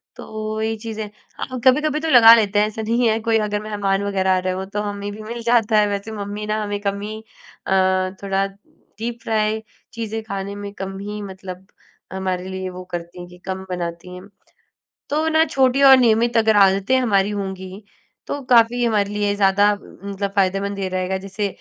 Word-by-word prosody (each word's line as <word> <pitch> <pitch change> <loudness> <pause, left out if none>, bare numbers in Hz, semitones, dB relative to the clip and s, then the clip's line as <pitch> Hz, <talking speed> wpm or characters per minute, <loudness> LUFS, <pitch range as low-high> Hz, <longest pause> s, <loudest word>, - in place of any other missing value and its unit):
तो 215 0 -5
ये 225 0 -1
चीजे 220 0 -5 0.3
हाँ, 255 -1 -5
कभी-कभी 300 +3 +3
तो 325 - -3
लगा 235 -5 +9
लेते 205 -2 +2
हैं, 210 - +3
ऐसा 220 +1 -6
नहीं 230 +2 +1
है। 220 +1 +1
कोई 225 0 +2
अगर 210 -1 -1
मेहमान 200 -2 -1
वगैरह 190 -2 0
आ - - +1
रहे 185 0 -2
हों, 190 +1 -4
तो 205 +2 -4
हमें 205 0 -4
भी 215 - -9
मिल 235 +2 -6
जाता 230 -2 +3
है। 210 - +3
वैसे 200 +2 -4
मम्मी 205 0 -5
ना, 215 0 -1
हमें 205 -1 -3
कम 200 0 -2
ही 215 +1 -5 0.5
अ, - - -3 0.5
थोड़ा 195 0 +1 0.5
डीप 235 +1 -4
फ्राय 220 -1 0 0.3
चीज़ें 225 -1 -4
खाने 200 -1 -5
में 205 0 -6
कम 195 -1 -6
ही, 210 +1 -6
मतलब 190 -1 -9 0.5
हमारे 185 -1 -3
लिए 190 0 -4
वो 185 0 -8
करती 175 +1 -6
हैं 175 - -8
कि 180 - -14
कम 190 0 -4
बनाती 175 0 -5
हैं। 180 +2 -11 0.8
तो 305 +2 +1
ना, 320 0 +4
छोटी 270 -2 +2
और 270 -1 +9
नियमित 235 0 +3
अगर 220 -1 +4
आदतें 195 +5 +4
हमारी 205 -5 +2
होंगी, 190 0 -6 0.4
तो 285 - -3
काफ़ी 240 0 +5
हमारे 210 -3 +1
लिए 205 -1 0
ज़्यादा 200 +1 +4
अ, - - -2 0.3
मतलब 200 0 -3
फायदेमंद 195 +1 +1
ये 190 -1 -2
रहेगा। 185 +1 -1
जैसे 195 +2 -3
205 Hz, 195 wpm, -21 LUFS, 195-225 Hz, 0.8 s, लगा